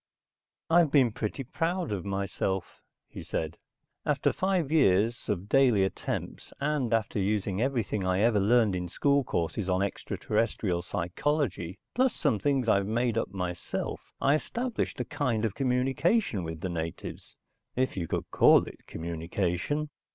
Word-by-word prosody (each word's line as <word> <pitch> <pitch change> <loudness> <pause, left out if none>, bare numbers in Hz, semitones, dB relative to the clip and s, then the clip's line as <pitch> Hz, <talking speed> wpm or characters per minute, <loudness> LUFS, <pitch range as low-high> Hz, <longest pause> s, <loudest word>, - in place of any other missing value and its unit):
"I've 165 -1 +5
been 135 -5 +4
pretty 110 +5 -3
proud 165 - -2
of 100 -4 -3
myself," 95 -2 -2 0.3
he - - -9
said. 80 0 -4 0.4
"After - - +1
five 185 -6 0
years 115 -7 +3
of 100 -1 -1
daily 125 -6 +4
attempts, - - -4
and 140 -5 0
after 115 -2 +1
using 100 0 0
everything 115 -6 0
I 95 +1 +1
ever 110 -2 +4
learned 110 -1 +3
in 90 -1 -3
school 140 - +2
courses 95 -1 -2
on 95 +1 +2
extraterrestrial 100 -2 -1
psychology, 90 - -2 0.2
plus 260 -1 +2
some 135 -9 +1
things 135 -2 +1
I've 100 -2 +3
made 115 +1 +1
up 115 - 0
myself, 90 -3 -4 0.2
I 140 - +3
established 235 +10 -2
a - - -1
kind 130 -7 -1
of 110 - -1
communication 130 - +1
with 80 -1 -6
the 95 - -2
natives 80 -1 -5 0.4
if 130 +1 0
you 85 -3 -3
could - - -2
call - - +6
it - - -12
communication. 90 - -2
110 Hz, 145 wpm, -29 LUFS, 95-140 Hz, 0.4 s, call